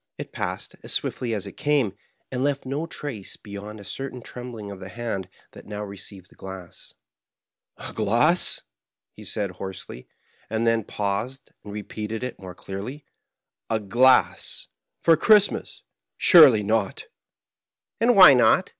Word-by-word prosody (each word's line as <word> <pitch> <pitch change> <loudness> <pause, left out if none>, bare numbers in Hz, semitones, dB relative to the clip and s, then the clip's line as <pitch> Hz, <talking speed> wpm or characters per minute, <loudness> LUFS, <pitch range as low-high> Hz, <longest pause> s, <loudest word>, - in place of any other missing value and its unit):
It - - -7
passed - - -4
as - - -5
swiftly 120 -2 -1
as 105 - -4
it 100 - -7
came, 145 -9 +1 0.4
and 130 0 -1
left 140 -1 0
no 140 +5 -3
trace 130 - -6
beyond 105 0 -9
a - - -10
certain 130 +3 -6
trembling 120 -5 -8
of 100 - -9
the 95 0 -8
hand 115 -6 -4 0.2
that - - -14
now 105 0 -5
received 100 -2 -8
the - - -20
glass. 95 -2 -10 0.8
"A - - -8
glass," 120 - +2 0.5
he - - -12
said, 100 -3 -1
hoarsely, 95 -8 -8 0.4
and 110 +1 -1
then 115 -2 +2
paused, 105 +7 -3
and 105 - -9
repeated 105 +2 -5
it 125 -1 -5
more 90 -2 -9
clearly. 105 +11 -7 0.6
"A 110 - +1
glass! 120 +6 +2 0.3
For 165 - +6
Christmas! 205 +4 +3 0.3
Surely 135 -11 +8
not!" 110 -1 -1 0.5
" - - -48
And 240 +1 +4
why 185 -7 +10
not 120 -3 +4
110 Hz, 145 wpm, -24 LUFS, 100-130 Hz, 0.8 s, why